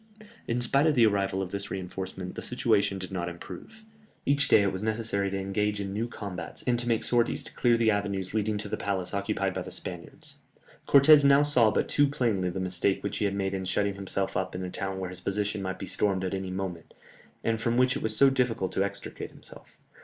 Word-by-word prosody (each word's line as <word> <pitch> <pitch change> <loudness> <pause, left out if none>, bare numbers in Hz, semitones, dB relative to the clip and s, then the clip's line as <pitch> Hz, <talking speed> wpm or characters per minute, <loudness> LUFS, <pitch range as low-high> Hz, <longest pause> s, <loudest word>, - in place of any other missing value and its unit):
In 120 +1 0
spite 140 +5 +3
of 155 - +3
the 120 -3 +6
arrival 95 -2 +1
of 90 - -7
this 100 0 -3
reinforcement, 95 0 -5
the - - -6
situation 105 -5 +1
did 95 0 -7
not 90 -2 -2
improve. 215 - -10 0.4
Each 140 -1 +3
day 105 - +6
it 100 - +1
was 95 0 -4
necessary 110 -2 -1
to 95 - -3
engage 105 +2 -1
in 100 -1 -4
new 110 +3 -1
combats, 100 -6 -7
and 120 -1 +2
to 120 - -3
make 115 -1 +1
sorties 120 +1 +1
to - - -12
clear 120 -2 +3
the 115 -1 +3
avenues 100 -2 -2
leading 110 -1 0
to 105 - -4
the - - -3
palace 95 -2 -2
occupied 100 -1 -1
by - - -3
the - - -7
Spaniards. - - -7 0.5
Cortès 145 +1 +7
now 140 +1 +6
saw 125 -7 +5
but - - 0
too 145 0 +3
plainly 115 -10 0
the 90 +2 -4
mistake 95 +1 0
which 100 0 -2
he - - 0
had 100 -1 0
made 95 -1 -1
in 95 -1 -2
shutting 100 +2 0
himself 100 0 -3
up 95 0 -2
in 90 - -4
a 90 - -5
town 95 -1 -4
where 95 -1 -4
his 90 0 -7
position 105 +1 -1
might 95 -1 -3
be - - -6
stormed 95 -1 0
at 95 - -2
any 95 -1 -3
moment, 95 -3 -5 0.5
and 115 -1 0
from 115 +1 +1
which 125 +1 +3
it - - -3
was 110 -1 -1
so 140 -1 +6
difficult 120 -8 0
to 95 - +1
extricate 100 0 -6
himself. - - -13
100 Hz, 230 wpm, -28 LUFS, 95-115 Hz, 0.5 s, Cortès